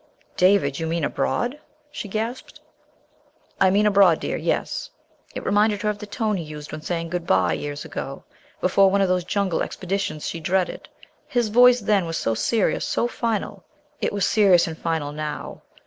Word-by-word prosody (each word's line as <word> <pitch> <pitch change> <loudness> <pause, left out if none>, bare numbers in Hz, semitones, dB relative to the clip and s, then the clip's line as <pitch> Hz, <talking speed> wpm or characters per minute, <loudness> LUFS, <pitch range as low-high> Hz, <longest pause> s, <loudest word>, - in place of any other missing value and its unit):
"David! 180 -7 +3
You 165 - -2
mean 165 0 -1
abroad?" 240 - -1 0.3
she 220 - -6
gasped. 225 +5 -4 1.0
"I 190 - +5
mean 205 +3 +3
abroad, 195 -5 +5
dear, - - -3
yes." - - -2 0.5
It - - -5
reminded 205 0 +2
her 210 - +2
of 205 - -8
the 210 - -8
tone 215 -1 -1
he 170 - -4
used 150 -1 -9
when 155 - -6
saying 165 +1 -3
good 175 0 -4
bye 90 -3 +3
years 145 - -5
ago, 135 - -6 0.4
before 190 +1 +4
one 200 +1 +2
of 195 - +3
those 180 -1 +1
jungle 190 -1 -1
expeditions 185 -4 -3
she 165 - -4
dreaded. 180 +3 -1 0.4
His 240 -3 0
voice 245 +2 +6
then 200 -4 +1
was 165 - -3
so 115 - 0
serious, 220 - 0
so 240 - 0
final. 230 -4 -3 0.4
It - - -1
was 200 -2 0
serious 190 -6 +4
and 165 -3 -5
final 160 -3 -2
now. 150 0 -6
190 Hz, 180 wpm, -23 LUFS, 160-210 Hz, 1.0 s, voice